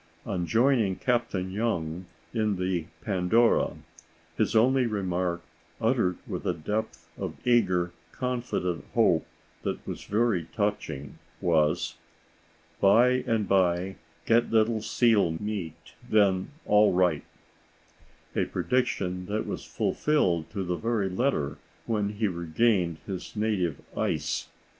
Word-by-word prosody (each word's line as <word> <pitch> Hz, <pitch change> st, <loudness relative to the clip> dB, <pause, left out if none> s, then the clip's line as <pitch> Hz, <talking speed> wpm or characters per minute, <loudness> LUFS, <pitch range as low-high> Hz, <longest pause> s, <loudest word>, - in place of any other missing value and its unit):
On 90 Hz, -3 st, -2 dB
joining 115 Hz, -5 st, +3 dB
Captain 115 Hz, -7 st, -1 dB
Young 90 Hz, -5 st, -2 dB, 0.3 s
in 110 Hz, -3 st, +1 dB
the 90 Hz, -3 st, -1 dB, 0.2 s
Pandora, 110 Hz, +3 st, +2 dB, 0.6 s
his -, -, 0 dB
only 125 Hz, +3 st, +4 dB
remark, 90 Hz, -4 st, -1 dB, 0.4 s
uttered 115 Hz, -6 st, +1 dB
with -, -, -5 dB
a -, -, +1 dB
depth 105 Hz, +7 st, -4 dB
of -, -, -4 dB
eager, 90 Hz, -8 st, +3 dB, 0.2 s
confident 120 Hz, -9 st, -2 dB
hope -, -, +3 dB, 0.3 s
that -, -, -4 dB
was -, -, -6 dB
very 105 Hz, -5 st, +1 dB
touching, 90 Hz, -, -2 dB, 0.2 s
was, 80 Hz, -1 st, +1 dB, 0.8 s
"By 115 Hz, +6 st, +6 dB, 0.2 s
and 110 Hz, -3 st, +1 dB
by 95 Hz, 0 st, +2 dB, 0.3 s
get 115 Hz, +1 st, +3 dB
little 110 Hz, 0 st, +2 dB
seal 105 Hz, -9 st, +2 dB
meat; 105 Hz, -6 st, -5 dB, 0.2 s
then 100 Hz, -3 st, +3 dB, 0.2 s
all 105 Hz, -1 st, +5 dB
right,"—a 90 Hz, -1 st, -4 dB
prediction 95 Hz, -8 st, -1 dB
that 105 Hz, +1 st, -2 dB
was -, -, -5 dB
fulfilled 90 Hz, -, +1 dB
to 100 Hz, -3 st, -3 dB
the 90 Hz, -1 st, -2 dB
very 110 Hz, -3 st, 0 dB
letter 90 Hz, -, -1 dB, 0.3 s
when 105 Hz, -2 st, -1 dB
he 105 Hz, +1 st, 0 dB
regained 85 Hz, 0 st, +1 dB
his 95 Hz, +1 st, -6 dB
native 100 Hz, -8 st, 0 dB, 0.2 s
ice. -, -, -1 dB
100 Hz, 115 wpm, -27 LUFS, 90-115 Hz, 0.8 s, By